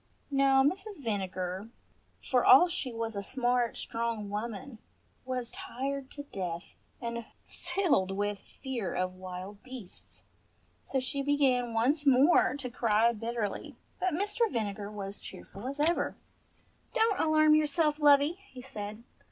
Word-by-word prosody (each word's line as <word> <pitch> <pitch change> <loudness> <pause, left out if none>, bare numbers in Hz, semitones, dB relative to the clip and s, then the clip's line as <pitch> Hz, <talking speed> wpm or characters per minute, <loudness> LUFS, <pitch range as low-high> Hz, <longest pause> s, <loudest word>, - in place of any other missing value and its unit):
Now 270 -1 +5
Mrs. 385 +6 0
Vinegar, 190 -3 -3 0.5
for 250 -3 +2
all 350 +7 +8
she 345 -7 -2
was 225 -1 -3
a 200 - -2
smart 245 +2 0
strong 230 -3 -3
woman, 225 +3 -5 0.5
was 250 -2 -2
tired 270 +1 -4
to 285 - -8
death, 180 -8 -5 0.2
and 235 -1 -4 0.2
filled 315 - 0
with 205 +1 -1
fear 240 -9 -5
of 185 0 -1
wild 185 +2 -8
beasts, 250 -7 -10 0.6
so 270 - -1
she 260 +2 -1
began 265 -4 +2
once 285 +6 +2
more 270 +1 +5
to 270 -3 -4
cry 230 -1 +3
bitterly; 225 -2 -3 0.2
but 370 -3 0
Mr. 415 +5 +1
Vinegar 205 -2 -2
was 200 -1 -6
cheerful 205 +6 -9
as 280 +2 -5
ever. 325 +4 +2 0.8
"Don't 445 -4 +3
alarm 310 -1 +5
yourself, 305 0 +2
lovey," 290 +4 +5
he 255 - -10
said. 210 -2 -7
250 Hz, 135 wpm, -30 LUFS, 210-285 Hz, 0.8 s, all